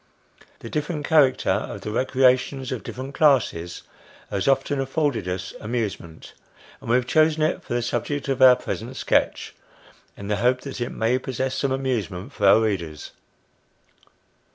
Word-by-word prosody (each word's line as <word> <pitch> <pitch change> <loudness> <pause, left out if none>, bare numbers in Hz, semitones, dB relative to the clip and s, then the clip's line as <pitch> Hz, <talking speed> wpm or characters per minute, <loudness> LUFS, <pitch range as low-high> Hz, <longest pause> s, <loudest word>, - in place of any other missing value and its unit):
The 115 - -8
different 150 0 -3
character 145 -5 +3
of - - -3
the 105 - -5
recreations 130 +2 +1
of 125 -4 -3
different 130 +2 -7
classes, 110 - +1 0.5
has 100 -2 -2
often 135 +1 +1
afforded 135 - -1
us 90 +1 -4
amusement; 105 -8 -5 0.5
and - - -9
we 120 - +4
have 125 -1 +2
chosen 155 +3 +3
it 165 +3 0
for 120 - -4
the 120 - 0
subject 120 +5 -2
of 135 -1 -1
our 130 -1 +9
present 120 +1 -6
sketch, - - 0 0.6
in 100 - -8
the 105 0 0
hope 125 +4 +2
that 140 -3 -7
it 120 - -1
may 115 +3 0
possess 130 0 -3
some 135 0 -1
amusement 125 - -3
for 100 - +1
our 105 +3 +6
readers. 85 -8 -3
125 Hz, 155 wpm, -23 LUFS, 110-135 Hz, 0.6 s, our